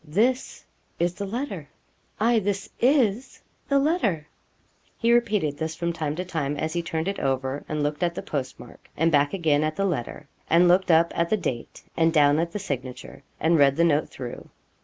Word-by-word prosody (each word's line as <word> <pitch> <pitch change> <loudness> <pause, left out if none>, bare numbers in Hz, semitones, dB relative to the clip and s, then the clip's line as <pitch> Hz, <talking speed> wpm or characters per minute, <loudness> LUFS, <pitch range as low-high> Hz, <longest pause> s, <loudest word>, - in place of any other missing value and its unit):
'This 235 - 0 0.3
is 175 +1 0
the 200 +2 -5
letter 200 - -5 0.5
aye, 230 +2 +3
this 200 -1 -2
is 250 -2 +2 0.3
the 280 - +3
letter.' 275 - +1 0.7
He 235 0 +3
repeated 210 -11 +1
this 160 0 -3
from 170 0 -2
time 155 -3 -3
to 180 +3 -4
time 150 -5 -2
as 160 +2 -2
he 175 - 0
turned 165 0 -3
it 195 - -2
over 135 +1 -1
and 150 -1 -1
looked 150 +2 -2
at 170 -1 0
the - - -5
postmark, 130 -3 -6
and 165 +2 +2
back 145 -1 +3
again 155 -6 +1
at 155 0 -1
the 195 - 0
letter, 150 -4 -3 0.2
and 170 +2 +5
looked 180 +2 +3
up 165 0 +4
at 170 0 0
the 215 - +2
date, 130 - -5
and 165 0 +3
down 145 -1 +4
at 170 0 -1
the 210 - -4
signature, 135 -12 -6 0.2
and 165 0 +3
read 140 -1 +5
the 170 - +3
note 155 -2 +2
through. 125 -2 -8
165 Hz, 195 wpm, -25 LUFS, 150-195 Hz, 0.7 s, and